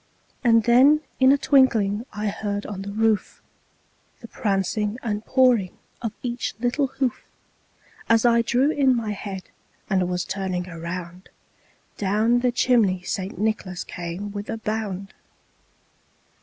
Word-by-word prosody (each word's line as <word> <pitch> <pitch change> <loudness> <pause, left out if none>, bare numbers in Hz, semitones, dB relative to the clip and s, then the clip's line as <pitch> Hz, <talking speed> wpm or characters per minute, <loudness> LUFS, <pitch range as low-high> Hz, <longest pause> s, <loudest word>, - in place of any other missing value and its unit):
And 230 -2 +5
then 265 +7 +5 0.2
in 260 0 +6
a 280 - +5
twinkling, 235 -6 +3
I 210 0 -4
heard 205 0 -3
on 195 -2 -6
the 200 +1 -6
roof 220 0 0 0.8
The 230 - -9
prancing 205 0 -1
and 210 -2 -2
pawing 250 -8 +2 0.2
of 230 -2 -2
each 240 -4 -3
little 245 +4 +1
hoof. 260 -2 -2 0.9
As 230 +1 +4
I 235 -1 +5
drew 255 +5 +2
in 270 -4 +3
my 225 -3 -2
head, 195 -2 -6 0.5
and 185 -2 +2
was 180 0 -2
turning 185 -2 -3
around, 170 +1 -7 0.7
Down 215 +4 +2
the 250 0 +1
chimney 225 -7 +2
St. 190 +1 -4
Nicholas 200 -3 -2
came 175 +4 -6
with 205 0 -6
a 225 - -2
bound. 210 -3 -4
215 Hz, 135 wpm, -24 LUFS, 195-240 Hz, 0.9 s, in